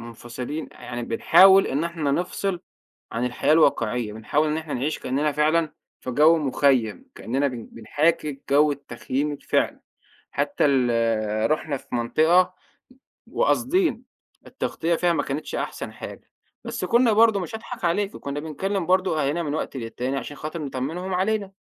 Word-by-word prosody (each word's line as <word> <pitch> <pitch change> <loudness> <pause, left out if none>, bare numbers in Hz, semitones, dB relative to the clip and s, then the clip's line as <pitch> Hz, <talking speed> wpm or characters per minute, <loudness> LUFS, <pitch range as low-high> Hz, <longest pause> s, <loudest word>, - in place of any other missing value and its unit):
مُنفصلين 120 +6 -6
يعني 120 -1 -7
بنحاول 190 +11 +6
إن 145 +5 -1
إحنا 165 -4 -2
نفصِل 180 +3 -1 0.5
عن 120 +1 -1
الحياة 125 +4 +1
الواقعية، 125 -8 +2
بنحاول 145 +8 0
إن 150 - 0
إحنا 160 -2 -4
نعيش 140 +5 -2
كأننا 145 +3 -1
فعلًا 155 +2 +1 0.3
في 130 - -5
جو 155 +6 +5
مخيَّم 130 - +1
كأننا 135 +6 -1
بن 120 -3 -7
بنحاكي 145 +4 -1
جو 145 +1 +5
التخييم 140 +1 -3
الفعلي. 145 - -1 0.5
حتى - - 0
ال 115 -4 +1
رُحنا 155 -2 0
في - - -10
منطقة، 160 +10 +3 0.7
وقاصدين، 360 - +1 0.4
التغطية 170 +1 -2
فيها 175 0 +2
ما - - 0
كانتش 140 +3 -4
أحسن - - -4
حاجة. - - -10 0.3
بس - - -4
كنا 235 -1 +4
برضو 220 -2 +5
مش 180 +4 -5
هاضحك 225 -3 -6
عليكِ، 200 +4 0
كنّا 140 +1 -5
بنكلم 180 +4 -3
برضو 185 -1 +2
أهالينا 150 +4 0
من 145 -1 -3
وقت 140 - -4
للتاني 125 +3 -3
عشان 145 +1 -6
خاطر 155 +2 -5
نطمنهم 150 +7 -4
علينا. 195 +1 0
150 Hz, 145 wpm, -24 LUFS, 130-175 Hz, 0.7 s, بنحاول